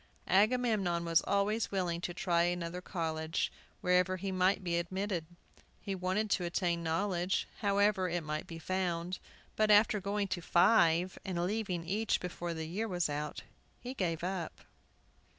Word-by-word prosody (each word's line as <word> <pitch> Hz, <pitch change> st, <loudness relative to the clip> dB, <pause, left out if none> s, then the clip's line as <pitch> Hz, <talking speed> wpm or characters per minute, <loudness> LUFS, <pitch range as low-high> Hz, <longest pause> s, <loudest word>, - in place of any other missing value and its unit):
Agamemnon 205 Hz, -4 st, +2 dB
was 165 Hz, -1 st, +4 dB
always 205 Hz, +3 st, +1 dB
willing 175 Hz, -3 st, -1 dB
to 175 Hz, -, -3 dB
try 175 Hz, -1 st, +1 dB
another 175 Hz, 0 st, -1 dB
college, 160 Hz, -3 st, -2 dB, 0.3 s
wherever 180 Hz, +1 st, +3 dB
he 195 Hz, +1 st, -3 dB
could 185 Hz, +1 st, +2 dB
be 170 Hz, -1 st, 0 dB
admitted. 185 Hz, -1 st, -3 dB, 0.5 s
He 200 Hz, -, -4 dB
wanted 190 Hz, +3 st, -1 dB
to 180 Hz, -, +2 dB
attain 175 Hz, 0 st, 0 dB
knowledge, 175 Hz, +2 st, 0 dB
however 200 Hz, -2 st, +2 dB
it 175 Hz, -1 st, -1 dB
might 155 Hz, 0 st, -4 dB
be 165 Hz, -, -7 dB
found. 180 Hz, 0 st, -2 dB, 0.4 s
But, 215 Hz, 0 st, +2 dB
after 210 Hz, 0 st, +5 dB
going 200 Hz, +1 st, -1 dB
to 175 Hz, -, -2 dB
five, 175 Hz, -1 st, +4 dB
and 180 Hz, -3 st, -1 dB
leaving 190 Hz, -4 st, -2 dB
each 210 Hz, +5 st, 0 dB
before 175 Hz, -1 st, -4 dB
the 160 Hz, 0 st, -4 dB
year 200 Hz, +8 st, -2 dB
was 175 Hz, -6 st, 0 dB
out, 150 Hz, +1 st, -4 dB, 0.4 s
he 250 Hz, +2 st, -6 dB
gave 170 Hz, -8 st, -2 dB
it -, -, +1 dB
up. 185 Hz, -3 st, -4 dB
180 Hz, 155 wpm, -33 LUFS, 170-200 Hz, 0.5 s, after